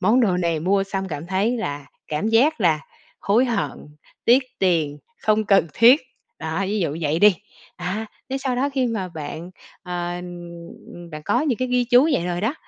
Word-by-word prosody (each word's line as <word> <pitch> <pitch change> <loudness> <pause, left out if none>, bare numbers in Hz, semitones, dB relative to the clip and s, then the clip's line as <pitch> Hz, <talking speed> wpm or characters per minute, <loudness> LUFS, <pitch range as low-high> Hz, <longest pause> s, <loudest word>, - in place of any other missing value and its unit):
món 220 +7 +4
đồ 195 -6 +2
này 170 -3 0
mua 195 +3 +2
xong 195 -1 -4
cảm 155 -1 -5
thấy 200 +6 0
là 145 -10 -4 0.2
cảm 155 +8 -1
giác 250 +5 +3
là 160 -5 +3 0.4
hối 220 +6 +3
hận, 235 -5 -2 0.4
tiếc 250 +3 +5 0.2
tiền, 160 -6 +1 0.2
không 215 0 +2
cần 195 -3 +4
thiết. 245 - +6 0.4
Đó, 160 +3 -3
ví 210 +2 -1
dụ 155 -4 -1
vậy 155 +1 0
đi, 205 -1 +6 0.4
á, 185 +5 -3 0.2
thế 270 - -1
sau 260 -2 -2
đó 275 +3 +1
khi 260 -2 +2
mà 215 -6 -2
bạn, 160 +1 -7 0.3
ờ, 175 -2 -3
ừm, 175 -1 -10
đã 155 -1 -7
có 240 +8 +2
những 280 -7 0
cái 255 0 -1
ghi 250 -1 +2
chú 250 +3 +5
vậy 175 -8 0
rồi 175 0 -2
đó, 230 +8 0
195 Hz, 195 wpm, -22 LUFS, 170-235 Hz, 0.4 s, thiết